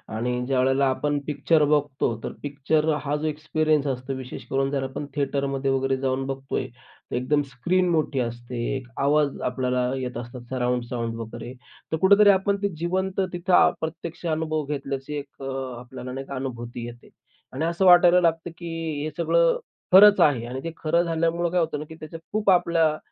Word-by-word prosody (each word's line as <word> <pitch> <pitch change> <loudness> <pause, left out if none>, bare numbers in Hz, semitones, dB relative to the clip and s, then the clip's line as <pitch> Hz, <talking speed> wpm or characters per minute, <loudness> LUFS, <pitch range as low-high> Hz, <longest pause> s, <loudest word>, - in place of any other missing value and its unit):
आणि 125 +2 -1
ज्यावेळेला 135 +1 +2
आपण 145 +2 0
पिक्चर 150 +1 +2
बघतो, 145 -5 +1
तर - - -3
पिक्चर 150 +2 0
हा 145 0 -1
जो 155 +1 -2
एक्सपिरियन्स 155 -1 0
असतो, 130 0 -3
विशेष 130 -1 -8
करून 135 +1 +1
जर 135 -1 -1
आपण 135 +2 -5
थिएटरमध्ये 140 -1 -1
वगैरे 135 0 +1
जाऊन 135 0 -1
बघतोय, 135 -1 -3
तर 120 +2 -12
एकदम 145 +4 +1
स्क्रीन 180 +9 +1
मोठी 155 -4 0
असते. 120 +2 -3
आवाज 145 0 +1
आपल्याला 125 0 0
येत 125 -1 -4
असतात, 120 +1 -7
सराउंड 125 -1 0
साउंड 115 -2 -3
वगैरे. 115 +2 -7 0.4
तर 160 - +1
कुठेतरी 200 +2 +7
आपण 200 +1 +3
ते 200 - +1
जिवंत, 185 +3 -1
तिथं 175 +1 +4
प्रत्यक्ष 165 +2 -6
अनुभव 155 -1 -1
घेतल्याची 140 0 -4
एक 140 - -9
अ, 135 0 -4 0.3
आपल्याला 125 +1 -8
नाही 135 +1 -5
का 140 - -6
अनुभूती 120 -2 -5
येते. 120 0 -11 0.4
आणि 145 +5 -1
असं 170 +3 0
वाटायला 180 0 +7
लागतं, 165 0 0
की 170 -1 -7 0.3
हे 155 - -2
सगळं - - +3 0.4
खरंच 205 +2 +9
आहे 125 -6 +3
आणि 130 +2 -5
ते 165 - -4
खरं 170 +2 +1
झाल्यामुळं 170 +1 0
काय 180 - +2
होतं 160 -3 -1
ना 150 - -6
की 160 - -9
त्या 155 0 -9
खूप 215 -1 +1
आपल्या, 165 -4 +3
145 Hz, 175 wpm, -25 LUFS, 130-165 Hz, 0.4 s, खरंच